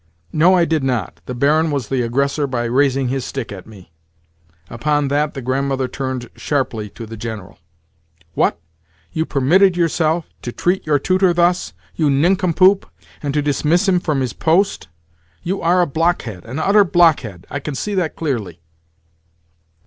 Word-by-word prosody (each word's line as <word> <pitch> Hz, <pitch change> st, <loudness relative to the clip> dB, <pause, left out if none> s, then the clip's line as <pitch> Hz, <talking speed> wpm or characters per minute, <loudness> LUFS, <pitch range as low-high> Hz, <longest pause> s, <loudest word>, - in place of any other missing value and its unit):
"No, 170 Hz, +5 st, +5 dB
I 175 Hz, -2 st, +3 dB
did 160 Hz, -3 st, 0 dB
not. 125 Hz, -8 st, -2 dB
The 125 Hz, -, -4 dB
Baron 155 Hz, +5 st, +2 dB
was 140 Hz, -6 st, -3 dB
the 130 Hz, -2 st, 0 dB
aggressor 140 Hz, +5 st, 0 dB
by 125 Hz, -3 st, -2 dB
raising 130 Hz, +1 st, +1 dB
his 135 Hz, 0 st, -2 dB
stick 130 Hz, -3 st, -5 dB
at 95 Hz, -3 st, -9 dB
me." 95 Hz, -6 st, -15 dB, 0.8 s
Upon 145 Hz, -, -1 dB
that 145 Hz, +2 st, 0 dB
the 135 Hz, -, -6 dB
Grandmother 135 Hz, +1 st, -1 dB
turned 130 Hz, -2 st, -4 dB
sharply 125 Hz, -7 st, -2 dB
to 115 Hz, +3 st, -9 dB
the 115 Hz, +1 st, -9 dB
General. 110 Hz, -4 st, -7 dB, 0.7 s
"What? -, -, +1 dB, 0.5 s
You 160 Hz, 0 st, -2 dB
permitted 175 Hz, +7 st, +3 dB
yourself 165 Hz, -1 st, +1 dB, 0.2 s
to 120 Hz, -, -5 dB
treat 180 Hz, +6 st, -1 dB
your 150 Hz, -1 st, +3 dB
tutor 185 Hz, +4 st, +2 dB
thus, 175 Hz, +1 st, +1 dB, 0.2 s
you 155 Hz, -3 st, +1 dB
nincompoop, 185 Hz, +5 st, +3 dB, 0.3 s
and 145 Hz, -, -2 dB
to 150 Hz, -, +1 dB
dismiss 155 Hz, +6 st, +1 dB
him 185 Hz, -2 st, +3 dB
from 150 Hz, -6 st, -1 dB
his 125 Hz, -3 st, -2 dB
post? 175 Hz, -, +1 dB, 0.6 s
You 190 Hz, +3 st, -2 dB
are 175 Hz, +2 st, +3 dB
a -, -, +3 dB
blockhead—an 135 Hz, -, -2 dB
utter 200 Hz, +5 st, +4 dB
blockhead! 160 Hz, -, +2 dB
I 145 Hz, -, -3 dB
can 145 Hz, 0 st, -5 dB
see 205 Hz, +10 st, -3 dB
that 180 Hz, -5 st, -1 dB
clearly." 115 Hz, -, -3 dB
145 Hz, 160 wpm, -19 LUFS, 125-170 Hz, 0.8 s, No